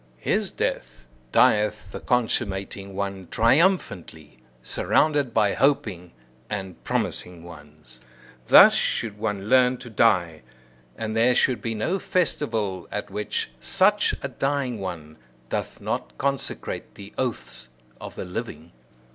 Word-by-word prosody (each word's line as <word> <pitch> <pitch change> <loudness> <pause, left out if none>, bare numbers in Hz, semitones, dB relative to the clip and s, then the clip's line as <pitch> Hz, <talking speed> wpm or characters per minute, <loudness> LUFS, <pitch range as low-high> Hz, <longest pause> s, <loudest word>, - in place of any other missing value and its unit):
His - - 0
death, - - -4 0.3
dieth 105 -2 +3
the - - -6
consummating 100 -5 -2
one 100 -2 -4
triumphantly, 115 - +1 0.2
surrounded 145 - +1
by 105 -3 +2
hoping 110 -12 0 0.4
and 95 -3 -6
promising 90 -2 -2
ones. 75 -6 -14 0.5
Thus - - +9
should 105 -2 -1
one 105 -2 -3
learn 125 +1 +4
to 120 - -11
die; 85 -8 +2 0.6
and 110 0 -4
there 120 +2 +4
should 120 -4 +2
be 115 0 -3
no 170 - -1
festival 115 - -1
at 105 - -4
which 105 -10 -3
such 205 - +3
a - - -1
dying 135 -2 -2
one 80 -5 -7 0.3
doth - - -4
not - - -4
consecrate 140 0 -3
the 100 +1 -11
oaths 125 - -4 0.3
of - - -9
the - - -5
living! 90 -4 -7
105 Hz, 120 wpm, -24 LUFS, 90-125 Hz, 0.6 s, Thus